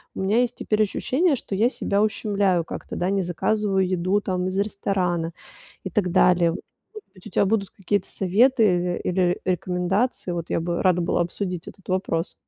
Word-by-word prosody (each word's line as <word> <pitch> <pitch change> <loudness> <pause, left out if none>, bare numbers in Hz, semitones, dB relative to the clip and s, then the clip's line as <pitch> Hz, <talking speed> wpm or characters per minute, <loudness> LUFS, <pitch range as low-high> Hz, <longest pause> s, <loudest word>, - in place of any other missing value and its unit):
у - - -6
меня 205 +5 +2
есть 245 - -1
теперь 215 0 +1
ощущение, 280 - +1
что 195 - -5
я 225 +5 +3
себя 200 -5 -1
ущемляю 200 -5 +1
как-то, - - -7
да, 180 +2 0
не 195 -1 +1
заказываю 190 +2 0
еду 185 +2 +1
там 185 -2 -2
из 185 +1 -1
ресторана 185 -5 -1 0.5
и - - -2
так 185 -5 0
далее. 175 -2 +4 0.4
Может 430 -1 -11
быть, 185 - -13
у - - -9
тебя 200 - +2
будут 200 -1 0
какие-то 200 +1 -2
советы 225 +6 +3
иры 180 -2 +1
или 180 -1 +1
рекомендации? 185 +4 -1
Вот 170 -1 -4
я - - 0
бы 170 0 -2
рада 180 -1 +3
была 175 - +1
обсудить 180 0 -4
этот 195 - -17
вопрос. 185 -2 -1
190 Hz, 185 wpm, -24 LUFS, 180-205 Hz, 0.5 s, далее